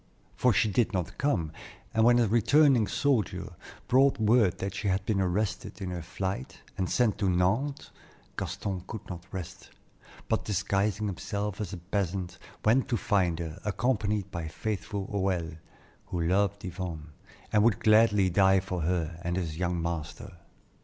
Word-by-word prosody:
For 125 Hz, -, +3 dB
she 110 Hz, -, +3 dB
did 110 Hz, +2 st, +1 dB
not 90 Hz, -3 st, -3 dB
come, 90 Hz, -, 0 dB, 0.4 s
and 110 Hz, -, +3 dB
when 120 Hz, +1 st, +6 dB
a 120 Hz, -2 st, +3 dB
returning 120 Hz, +2 st, +4 dB
soldier 130 Hz, -5 st, 0 dB, 0.3 s
brought 135 Hz, +1 st, +4 dB
word 110 Hz, -4 st, +4 dB
that 100 Hz, -1 st, -3 dB
she 100 Hz, +2 st, -3 dB
had 95 Hz, 0 st, 0 dB
been 100 Hz, -3 st, +1 dB
arrested 100 Hz, +4 st, -2 dB
in 95 Hz, -2 st, -4 dB
her 90 Hz, -1 st, -4 dB
flight, 95 Hz, -3 st, -4 dB, 0.2 s
and 95 Hz, -1 st, -2 dB
sent 110 Hz, -4 st, +2 dB
to 100 Hz, -3 st, +2 dB
Nantes, 110 Hz, +12 st, 0 dB, 0.4 s
Gaston 95 Hz, -3 st, -4 dB
could 110 Hz, -, -7 dB
not 90 Hz, 0 st, -9 dB
rest, 95 Hz, -1 st, -7 dB, 0.6 s
but -, -, 0 dB
disguising 100 Hz, +1 st, 0 dB
himself 100 Hz, +1 st, -3 dB
as 105 Hz, -, -4 dB
a 95 Hz, -, -5 dB
peasant, 90 Hz, 0 st, -3 dB, 0.3 s
went 120 Hz, +5 st, +4 dB
to 120 Hz, -, 0 dB
find 90 Hz, -6 st, +1 dB
her, 80 Hz, +1 st, -6 dB
accompanied 105 Hz, -2 st, 0 dB
by 85 Hz, -2 st, -4 dB
faithful 100 Hz, +3 st, -4 dB
Hoël, 90 Hz, -5 st, -2 dB, 0.5 s
who 90 Hz, -, -3 dB
loved 100 Hz, +4 st, +1 dB
Yvonne, 85 Hz, -4 st, -6 dB, 0.4 s
and 105 Hz, -1 st, +5 dB
would 110 Hz, -5 st, +3 dB
gladly 110 Hz, -3 st, +5 dB
die 95 Hz, +1 st, +5 dB
for 90 Hz, -2 st, -4 dB
her 85 Hz, 0 st, -1 dB
and 85 Hz, +1 st, -1 dB
his 85 Hz, -4 st, -3 dB
young 90 Hz, -1 st, 0 dB
master. 85 Hz, +2 st, -5 dB
95 Hz, 160 wpm, -29 LUFS, 90-110 Hz, 0.6 s, when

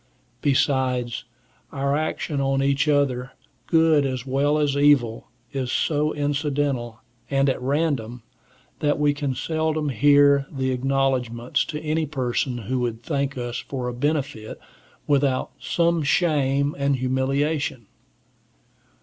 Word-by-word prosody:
Besides, 130 Hz, -4 st, +1 dB, 0.5 s
our 140 Hz, 0 st, 0 dB
action 155 Hz, -1 st, -2 dB
on 135 Hz, 0 st, +1 dB
each 140 Hz, +2 st, +1 dB
other, 135 Hz, -3 st, +1 dB, 0.3 s
good 160 Hz, -3 st, +4 dB
as 130 Hz, -2 st, -3 dB
well 140 Hz, +3 st, +1 dB
as 145 Hz, -2 st, +1 dB
evil, 140 Hz, -6 st, +3 dB, 0.2 s
is 130 Hz, -3 st, -3 dB
so 150 Hz, 0 st, +1 dB
incidental 145 Hz, -5 st, -1 dB, 0.3 s
and 135 Hz, 0 st, +2 dB
at 130 Hz, -, 0 dB
random, 130 Hz, -4 st, -1 dB, 0.6 s
that 145 Hz, -1 st, +1 dB
we 145 Hz, -1 st, +2 dB
can 145 Hz, -2 st, -3 dB
seldom 155 Hz, +1 st, -1 dB
hear 140 Hz, +2 st, +4 dB
the 130 Hz, -2 st, -1 dB
acknowledgments 130 Hz, -2 st, 0 dB
of 150 Hz, -, -4 dB
any 155 Hz, 0 st, 0 dB
person 130 Hz, -2 st, -1 dB
who 130 Hz, +3 st, -1 dB
would 120 Hz, -2 st, -3 dB
thank 140 Hz, -1 st, -2 dB
us 120 Hz, -1 st, -3 dB
for 130 Hz, -3 st, -5 dB
a 125 Hz, -, -3 dB
benefit, 140 Hz, -4 st, -2 dB, 0.5 s
without 140 Hz, -2 st, +1 dB
some 170 Hz, -1 st, +1 dB
shame 145 Hz, -2 st, +1 dB
and 140 Hz, 0 st, +2 dB
humiliation. 130 Hz, 0 st, -1 dB
140 Hz, 125 wpm, -23 LUFS, 130-145 Hz, 0.6 s, good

